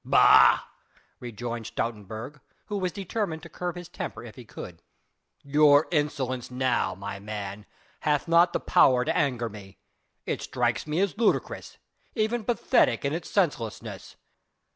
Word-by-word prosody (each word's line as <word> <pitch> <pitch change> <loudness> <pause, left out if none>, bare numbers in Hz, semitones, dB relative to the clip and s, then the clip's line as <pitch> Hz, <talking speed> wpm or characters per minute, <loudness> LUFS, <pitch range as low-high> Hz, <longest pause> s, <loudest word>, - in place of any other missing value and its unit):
"Bah!" - - +6 0.6
rejoined 120 -1 -5
Stoutenburg, 110 +5 -5 0.3
who 205 -1 -3
was 185 -1 -1
determined 190 -4 -3
to 170 - -10
curb 175 +2 -4
his 175 -1 -8
temper 175 - -6
if 115 -3 -10
he 125 - -10
could, 90 -6 -10 0.6
"your 145 +1 +5
insolence 140 -5 -1
now, 125 -7 0
my 100 +1 -6
man, 105 -1 -6 0.3
hath 150 0 0
not 170 +1 +5
the - - -1
power 125 -2 +4
to - - 0
anger 125 -4 0
me. 100 -3 -11 0.5
It - - -2
strikes 120 +1 -1
me 155 +4 0
as 200 +2 -1
ludicrous 230 - 0 0.4
even 225 0 0
pathetic 240 - +2
in 140 - 0
its 165 0 -4
senselessness. 145 - -2
135 Hz, 140 wpm, -27 LUFS, 115-170 Hz, 0.6 s, Bah